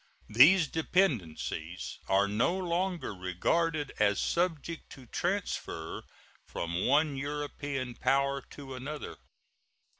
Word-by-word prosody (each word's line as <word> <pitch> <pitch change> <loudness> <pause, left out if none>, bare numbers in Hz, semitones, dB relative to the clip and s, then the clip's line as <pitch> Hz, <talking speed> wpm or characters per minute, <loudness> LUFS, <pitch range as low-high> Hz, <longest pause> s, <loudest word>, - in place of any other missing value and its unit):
These 155 - +7
dependencies 105 - -1
are 100 +1 +3
no 115 - +1
longer 180 - -1
regarded 145 - 0
as 100 -1 +3
subject 165 -2 -1
to 130 - -12
transfer 175 - -3 0.5
from 85 +2 -2
one 145 +2 +3
European 145 -2 -3
power 140 +3 +1
to 135 -2 -9
another. 145 +4 -6
140 Hz, 95 wpm, -31 LUFS, 105-165 Hz, 0.5 s, These